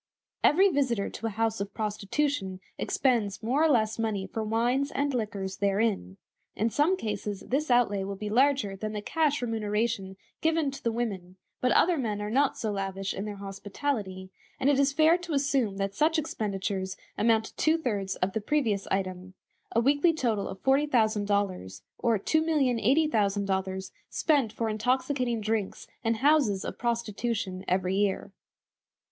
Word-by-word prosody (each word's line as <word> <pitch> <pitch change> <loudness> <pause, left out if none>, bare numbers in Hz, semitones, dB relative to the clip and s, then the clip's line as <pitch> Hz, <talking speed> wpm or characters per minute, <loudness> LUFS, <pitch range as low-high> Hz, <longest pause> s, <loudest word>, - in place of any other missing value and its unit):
Every 375 +6 +6
visitor 260 - 0
to 225 - -4
a 215 -2 -6
house 225 -2 0
of 200 0 -5
prostitution 210 -1 -1 0.2
expends 230 -7 0
more 260 +7 +2
or 320 - +4
less 225 -5 +2
money 215 -4 -1
for 220 +3 -4
wines 240 +6 +1
and 285 -1 -1
liquors 205 -5 -3
therein. 200 - 0 0.4
In 225 +2 0
some 320 +9 +2
cases 210 - -4
this 285 +4 -1
outlay 230 -5 +3
will 195 +1 -4
be 210 +2 -5
larger 245 -3 +2
than 215 +2 -4
the 210 - -3
cash 300 -2 +1
remuneration 210 -3 -1 0.2
given 320 -3 +1
to 275 - -10
the 230 - +1
women, 195 -6 -3 0.2
but 250 - +2
other 345 -3 +4
men 215 -5 -2
are 210 0 -3
not 275 +3 +2
so 220 - -2
lavish 195 -1 -3
in 195 - -4
their 210 -1 -5
hospitality; 195 -1 -4 0.3
and 275 +2 +3
it 275 - +2
is 280 0 +3
fair 315 +4 +4
to 345 -2 -5
assume 270 -7 +1
that 195 0 -2
such 315 - +2
expenditures 195 -8 -2 0.2
amount 225 0 +3
to - - -11
two 315 +1 +3
thirds 205 -10 -2
of 185 +1 -1
the 220 - -1
previous 220 -6 0
item 185 -1 -3 0.4
a 230 - +2
weekly 285 +7 +3
total 225 -9 0
of 190 - -8
$40,000, 205 - +1 0.2
or 230 -3 +2
$2,080,000 215 -9 +1 0.2
spent 280 -9 +2
for 230 +1 -2
intoxicating 250 +2 0
drinks 215 -2 -2 0.2
in 225 0 +1
houses 260 -6 +3
of - - -6
prostitution 230 -4 -2
every 185 0 +1
year. 200 -1 0
220 Hz, 160 wpm, -28 LUFS, 200-270 Hz, 0.4 s, Every